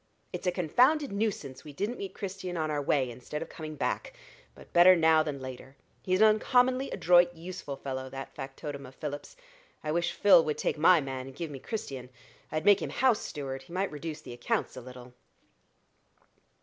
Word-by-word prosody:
"It's - - -4
a - - +4
confounded 250 - +3
nuisance 200 -11 -3
we 150 - -10
didn't 210 - -3
meet 195 -1 -6
Christian 185 -2 -5
on 155 -1 -1
our 145 -1 -1
way, 135 -3 +1
instead 125 +6 -6
of - - -13
coming 155 -1 -7
back; - - -2 0.4
but - - -16
better 180 +2 +8
now 160 -2 +5
than 150 -3 -3
later. 130 +1 -9 0.3
He's 185 +2 +1
an 220 - +9
uncommonly 255 +4 +3
adroit, 175 0 +4
useful 165 -4 -7
fellow, 130 -1 -5
that 135 0 -8
factotum 140 +1 -7
of 130 - -15
Philip's. 145 - -6 0.5
I 155 - -2
wish 170 +2 0
Phil 200 -5 +6
would 150 -1 -2
take - - -1
my 165 +1 +6
man 130 -1 -5
and 135 - -11
give 165 0 -5
me 135 - -7
Christian. 135 - -6 0.4
I'd 155 +1 -2
make 205 -1 +6
him - - -3
house 250 -4 +2
steward: 135 -3 -5
he 150 +6 -14
might 190 +2 -1
reduce 155 +1 -6
the 120 - -9
accounts 120 +2 -2
a 130 - -7
little." 125 0 -12
155 Hz, 190 wpm, -29 LUFS, 135-185 Hz, 0.5 s, an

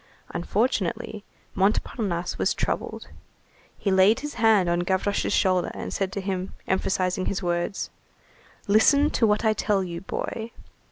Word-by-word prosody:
Unfortunately, 205 +1 -1 0.3
Montparnasse 195 -2 0
was - - +1
troubled. - - -3 0.7
He 200 - -1
laid 190 +4 +5
his 295 0 -5
hand 220 -5 +4
on 175 0 +1
Gavroche's 190 +3 0
shoulder, 185 -2 +2
and - - -5
said 195 -1 -1
to 200 - -3
him, 190 -1 -3
emphasizing 185 -1 0
his 195 -1 -2
words: 175 +2 -2 0.8
"Listen 280 +9 +5
to 225 - +3
what 210 +2 +1
I 220 - +4
tell 205 -2 +1
you, 170 -2 -5
boy! 225 +4 -5
195 Hz, 135 wpm, -25 LUFS, 185-215 Hz, 0.8 s, laid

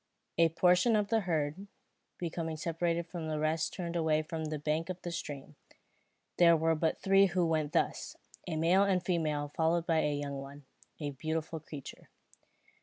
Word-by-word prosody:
A 165 -1 +6
portion 180 +7 +4
of 205 -1 +1
the 225 0 +3
herd, 170 0 -2 0.5
becoming 165 -2 -3
separated 170 +1 -1
from 170 -2 -6
the 155 -1 -2
rest 155 +1 0
turned 175 -2 -5
away 155 -2 +2
from 160 0 -4
the 155 0 -3
bank 155 +3 -1
of 185 -1 -4
the 175 - -4
stream. 145 -4 -6 0.8
There 170 -1 +6
were 165 +1 +2
but 160 0 0
three 195 0 +5
who 180 -1 +1
went 155 -2 0
thus, - - 0 0.3
a 165 - -2
male 170 +5 +4
and 190 -3 +2
female 155 -5 0
followed 165 +1 +2
by 165 -2 +2
a 150 -1 +1
young 140 -1 -4
one, 140 +1 -10 0.3
a 145 -2 -3
beautiful 160 +3 -3
creature. 150 -3 -10
165 Hz, 175 wpm, -32 LUFS, 155-175 Hz, 0.8 s, A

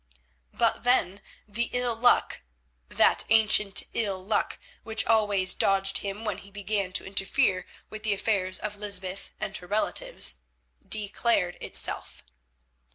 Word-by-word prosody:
But - - 0
then 205 -6 +1 0.3
the 235 +3 -1
ill 245 -1 +1
luck—that - - +1
ancient 210 -2 +4
ill 200 -4 -1
luck 205 +3 -1 0.2
which 220 -1 -1
always 205 -4 +3
dogged 195 0 +1
him 200 +2 -5
when 210 -4 -2
he 200 - -14
began 200 -1 -2
to - - 0
interfere 195 0 0 0.2
with 215 - -7
the 215 -2 0
affairs 190 -3 0
of 210 -1 -5
Lysbeth 200 -2 -3
and - - -4
her 180 - -12
relatives—declared 215 - -1
itself. 65 - -4
200 Hz, 120 wpm, -27 LUFS, 190-220 Hz, 0.3 s, ancient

